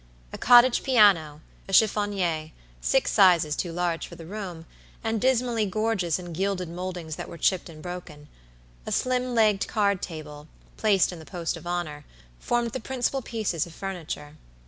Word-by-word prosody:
A - - -5
cottage 245 0 +6
piano, 190 - +4 0.3
a - - -5
chiffonier, 190 -6 +2 0.3
six - - +2
sizes 175 -7 +5
too 175 - -3
large 170 -1 -2
for - - -11
the 165 - -11
room, 180 -3 -7 0.4
and 225 -1 -1
dismally 240 -4 +2
gorgeous 195 -5 0
in 175 -2 -8
gilded 185 0 -1
moldings 175 -2 -5
that - - -6
were - - -9
chipped 180 +2 +1
and 155 -2 -12
broken; 170 -5 -8 0.6
a - - -3
slim 255 -1 0
legged 215 -3 +3
card 200 -3 +1
table, 150 -2 -8 0.3
placed 200 -5 +3
in 175 - -9
the - - -10
post 170 0 -4
of 165 0 -10
honor, 165 -4 -3 0.4
formed 240 -1 0
the 260 - -4
principal 265 +1 -2
pieces 215 - -2
of 165 - -13
furniture. 160 -6 -6
185 Hz, 165 wpm, -26 LUFS, 165-220 Hz, 0.6 s, cottage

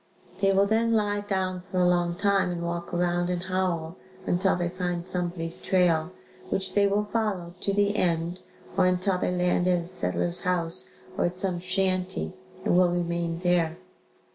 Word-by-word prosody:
They 195 0 +3
will 195 +1 +4
then 225 +2 +2
lie 205 -2 +1
down 190 -3 -2
for 185 - -3
a 180 -1 +4
long 175 -1 +2
time 200 0 +2
and 175 -1 -3
walk 170 0 -4
around 175 0 0
and 175 -1 -2
howl 185 -2 -1 0.3
until 190 +2 +2
they 175 -1 -1
find 175 -1 -3
somebody's 175 -2 -1
trail, 175 -3 +2 0.4
which 190 - -1
they 200 -1 +4
will 205 +1 +1
follow 205 -6 -2
to 200 - 0
the 205 +1 +2
end 170 -1 0 0.4
or 185 - +4
until 185 +1 +1
they - - 0
land 180 0 +1
at 180 -1 +3
a 170 - -9
settler's 175 -1 -1
house 180 -2 +1 0.3
or - - +3
at 175 +1 -2
some 185 -2 -1
shanty 185 0 -1 0.3
and - - +3
will 180 0 +5
remain 170 -1 -1
there. 175 -2 +2
180 Hz, 175 wpm, -27 LUFS, 175-190 Hz, 0.4 s, will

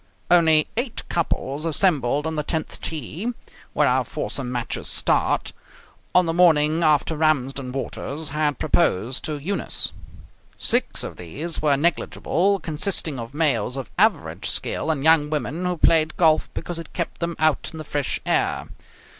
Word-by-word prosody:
Only 160 -3 +5
eight 240 -1 -3
couples 155 -3 -2
assembled 150 -4 +1
on 160 0 -2
the 150 - 0
tenth 160 +1 -4
tee 165 - -3 0.4
(where - - +3
our - - +2
foursomes 130 -3 -3
matches 120 -2 -3
start) - - +1 0.6
on 180 0 +6
the 165 - -1
morning 160 -2 +4
after 155 0 +2
Ramsden 135 -4 0
Waters 140 +3 -4
had 150 0 0
proposed 130 - +1
to 155 -1 -3
Eunice. 185 +8 -2 0.7
Six - - +1
of - - -7
these 150 - -3
were 145 -2 +3
negligible, 175 +4 +1
consisting 155 -3 0
of 115 +4 -8
males 135 -6 +1
of 135 - -6
average - - +1
skill - - -1
and 145 -4 0
young 160 -2 +4
women 155 +3 -3
who 180 -1 -1
played 155 -1 +3
golf 160 -3 +3
because 175 -1 -4
it 165 - -10
kept 170 - -4
them 170 -1 -2
out 155 -2 +1
in 160 - -9
the 155 - -6
fresh 145 -2 -2
air. - - 0
155 Hz, 155 wpm, -23 LUFS, 140-165 Hz, 0.7 s, on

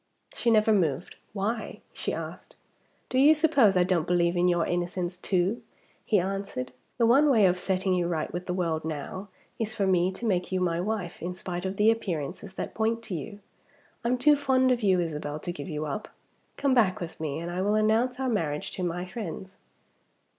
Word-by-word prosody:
She 235 - 0
never 220 -1 +4
moved. 170 -4 0
"Why?" 215 +3 -3
she - - -3
asked. - - -7 0.5
"Do 255 - +1
you 300 +4 +7
suppose 285 - +4
I 180 - +5
don't 175 -3 +1
believe 175 0 +2
in 175 +1 +3
your 175 -2 +2
innocence 175 0 -2
too?" 185 +4 0 0.4
he 215 - +2
answered. 195 -8 -3 0.3
"The 235 - +3
one 275 +6 +5
way 225 -7 +5
of 180 0 +3
setting 190 0 0
you 175 -1 +1
right 160 -3 -2
with 175 +1 -5
the 180 - -1
world 165 -3 -1
now 160 +5 -5 0.3
is 220 -1 -2
for 200 - +1
me 185 -1 +3
to 235 - -6
make 185 -5 0
you 185 - +1
my 170 -2 0
wife, 195 -3 -3
in 180 +1 -4
spite 180 0 -4
of 190 +1 -5
the 215 +2 +5
appearances 190 -2 -4
that - - -4
point 225 +1 0
to 220 - -6
you. 205 +5 -6 0.6
I'm 245 +2 +1
too 295 +4 +5
fond 260 -2 +2
of 245 -1 +1
you, 190 -3 +3
Isabel, 150 -3 -3
to 175 - -4
give 185 - -7
you 155 -1 -3
up. 150 +8 -4 0.5
Come 275 -2 +2
back 215 -7 +3
with 170 -2 -7
me, 155 -2 -3
and 170 +1 -5
I 180 +1 -2
will 205 +2 +2
announce 225 +4 +2
our 265 - 0
marriage 160 -11 -1
to 185 - -4
my 175 +1 -2
friends." 190 -1 -7
185 Hz, 205 wpm, -27 LUFS, 175-220 Hz, 0.6 s, you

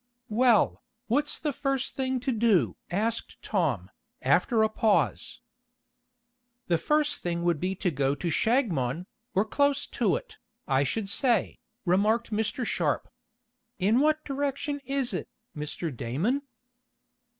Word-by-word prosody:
"Well, 235 0 +3 0.2
what's 285 +6 +2
the 300 -2 -2
first 275 -1 -1
thing 260 -1 0
to 260 - 0
do?" 210 - +3
asked 220 +5 -2
Tom, 140 - 0 0.3
after 180 - +3
a - - +5
pause. 215 -1 +1 1.2
"The 170 -6 +1
first 300 - +1
thing 170 -1 -2
would 170 -3 +2
be 185 +3 -1
to 185 -1 0
go 140 -1 +1
to 170 +4 -3
Shagmon, 175 - +1 0.3
or 195 +3 +3
close 285 +4 +1
to - - +1
it, 485 -3 -7 0.3
I 135 0 +3
should 200 +9 -2
say," 230 +1 +1 0.3
remarked 210 +6 +2
Mr. 220 +3 -1
Sharp. - - -1 0.7
"In 205 +6 +3
what 310 +2 +2
direction 285 +1 -2
is 275 -2 -1
it, - - -3 0.3
Mr. 150 0 -4
Damon?" 185 - -1
220 Hz, 130 wpm, -28 LUFS, 170-270 Hz, 1.2 s, a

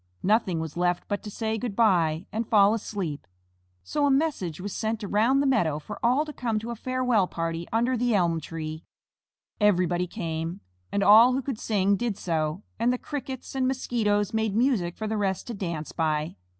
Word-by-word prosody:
Nothing 195 -4 +2
was 160 -2 -5
left 175 0 0
but 205 - -2
to 210 - -7
say 220 +1 -2
"Good 235 -4 -4
by," 175 -7 +2
and 220 +1 -3
fall 205 -1 +5
asleep. 195 -9 -4 0.6
So 285 - 0
a - - +3
message 270 - 0
was 195 +2 -5
sent 220 0 -2
around 225 +7 +2
the - - +1
meadow 180 - +2
for 200 +7 -9
all 255 +6 +3
to 300 - -8
come 230 -5 -1
to 225 +2 -4
a - - -4
farewell 250 -4 +1
party 165 0 -3
under 240 +3 +1
the 245 -1 +1
elm 170 -4 +2
tree. 155 0 -6 0.8
Everybody 180 -4 +2
came, 165 0 -4 0.3
and 200 - +1
all 225 +5 +8
who 265 - 0
could 255 -5 -4
sing 200 -2 +1
did 230 -3 -2
so, 160 +2 -2 0.2
and 235 +2 +3
the 250 - 0
Crickets 265 -2 -6
and 260 -1 +1
Mosquitoes 215 -6 0
made 220 -2 0
music 220 -8 +1
for 220 - -4
the 215 0 -1
rest 195 -2 -1
to 240 - -5
dance 170 -7 -4
by. 155 -1 -1
205 Hz, 190 wpm, -26 LUFS, 175-235 Hz, 0.8 s, all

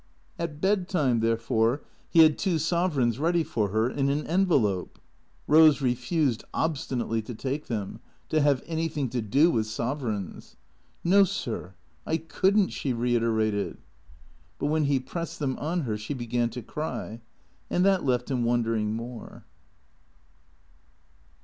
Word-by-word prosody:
At 160 -3 -4
bed 190 0 +1
time, 140 - +2
therefore, 115 +3 +1 0.3
he 165 - +7
had 155 -1 +5
two 180 -4 +1
sovereigns 155 -7 +1
ready 170 +2 +2
for 105 -8 -1
her 110 +3 +1
in 140 +2 0
an 145 +2 -1
envelope. 145 - +1 0.5
Rose 155 -1 +6
refused 130 0 0
obstinately 130 -7 -1
to 115 +2 -8
take 140 +6 -4
them; 105 -5 -4 0.3
to 155 - +2
have 140 -3 +2
anything 160 -5 -2
to 125 -1 -1
do 140 +11 +3
with 110 -2 0
sovereigns. 115 -4 -4 0.2
" - - -38
No, 195 +3 +6
sir, 120 - -4 0.3
I 160 - 0
could 190 +5 +1
n't," 200 -3 +3
she 135 - -2
reiterated. 115 -3 0 0.8
But 145 - -1
when 155 -1 +2
he 140 -1 +2
pressed 165 +6 -6
them 135 -4 -1
on 170 +4 -1
her 110 -7 -2
she 105 +7 -4
began 120 -1 -1
to 120 +1 -7
cry. 115 -4 -5 0.5
And 180 - +2
that 195 -2 +3
left 125 0 0
him 125 -2 0
wondering 115 -2 0
more. 115 +1 -8
130 Hz, 145 wpm, -27 LUFS, 115-160 Hz, 0.8 s, he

